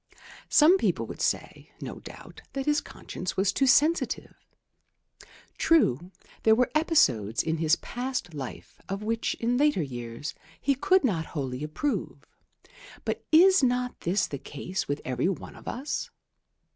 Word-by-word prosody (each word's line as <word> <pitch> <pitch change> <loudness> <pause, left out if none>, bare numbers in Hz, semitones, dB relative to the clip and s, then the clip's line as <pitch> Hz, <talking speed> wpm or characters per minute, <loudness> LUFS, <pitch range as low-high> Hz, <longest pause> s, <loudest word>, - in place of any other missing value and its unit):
Some 335 +6 +6
people - - 0
would - - -8
say, - - -2
no - - -7
doubt, - - -12
that 270 -1 -3
his 295 -1 +2
conscience 180 - -7
was 195 +1 +2
too 270 - +2
sensitive. 305 +6 +2 1.3
True, 175 - +3 0.3
there 220 0 +5
were 250 +2 +2
episodes 125 - +2
in 160 0 -1
his 160 0 +3
past 245 -8 -4
life 135 -4 -8
of 195 +2 -3
which 225 +1 -1
in 240 +1 0
later 290 - +3
years 120 0 -6 0.3
he 280 - +2
could 295 +7 +3
not 175 -11 0
wholly 130 -1 -3
approve; 155 - -3 0.8
but - - -2
is 370 +3 +7
not 250 -1 0
this 180 +3 +1
the 140 - -6
case 180 +8 -5
with 145 +1 -2
every 130 +7 0
one 195 - -5
of - - -14
us? 270 +4 -3
215 Hz, 145 wpm, -27 LUFS, -, 1.3 s, is